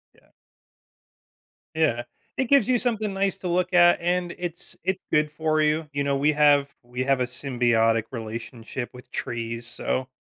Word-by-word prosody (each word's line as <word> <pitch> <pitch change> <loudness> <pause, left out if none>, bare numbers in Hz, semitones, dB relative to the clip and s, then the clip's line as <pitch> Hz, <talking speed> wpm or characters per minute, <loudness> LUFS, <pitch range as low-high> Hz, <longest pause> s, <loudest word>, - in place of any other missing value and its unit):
Yeah. - - -27 1.5
Yeah. 145 -7 +1 0.3
It 265 - +1
gives 275 -3 +4
you 250 -1 +3
something 220 -4 -1
nice 195 0 0
to 180 - -4
look 180 +1 0
at, 175 0 +6
and 175 0 0
it's 175 -1 -6
it's 190 0 0
good 150 -1 +3
for 155 0 0
you. 155 +1 +1
You 140 0 -1
know, 140 0 +1
we 145 +2 +3
have 145 -2 +4
we 125 +1 -4
have 135 0 +2
a - - +2
symbiotic 120 -3 +1
relationship 115 +1 -6
with 125 0 -14
trees, 115 0 -4
so 130 +1 -2
145 Hz, 165 wpm, -25 LUFS, 125-175 Hz, 1.5 s, at